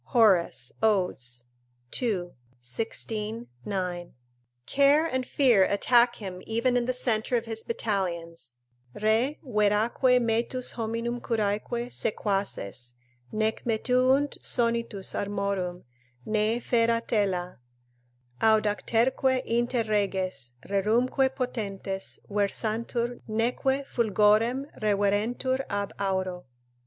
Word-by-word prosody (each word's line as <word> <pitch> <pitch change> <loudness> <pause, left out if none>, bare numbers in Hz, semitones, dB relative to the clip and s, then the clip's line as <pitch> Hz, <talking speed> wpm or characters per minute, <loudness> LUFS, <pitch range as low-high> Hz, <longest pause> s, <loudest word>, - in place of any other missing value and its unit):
Horace, 190 - +3
Od., 200 -9 +2 0.8
ii. 190 -8 -1 0.3
16, 220 - -4 0.2
9.] 180 -3 -3 0.5
Care 285 +3 +4
and 260 -5 -2
fear 245 -9 +4
attack 240 +4 +3
him 185 -3 -7
even 235 +3 +1
in 245 -1 +1
the - - +2
centre 245 -1 +1
of 230 - -3
his 225 -1 -4
battalions: 170 - -3 0.4
"Re 225 +7 +2
veraque 225 +2 +3
metus 235 +2 0
hominum 230 +1 -3
curaeque 230 +2 -1
sequaces 195 - -2 0.4
Nec 220 +1 -1
metuunt 255 +5 +2
sonitus 230 -5 0
armorum, 200 -3 -2 0.4
nee 215 +1 +1
fera 230 -1 +2
tela; 185 - 0 0.8
Audacterque 225 +4 +2
inter 240 +1 +1
reges, 190 - -1
rerumque 235 +7 +2
potentes 200 -6 -3
Versantur, 225 +4 -1
neque 250 +5 0
fulgorem 225 +3 +2 0.2
reverentur 215 +6 +1
ab 200 -1 -2
auro." 190 -2 -2
220 Hz, 90 wpm, -27 LUFS, 200-240 Hz, 0.8 s, Care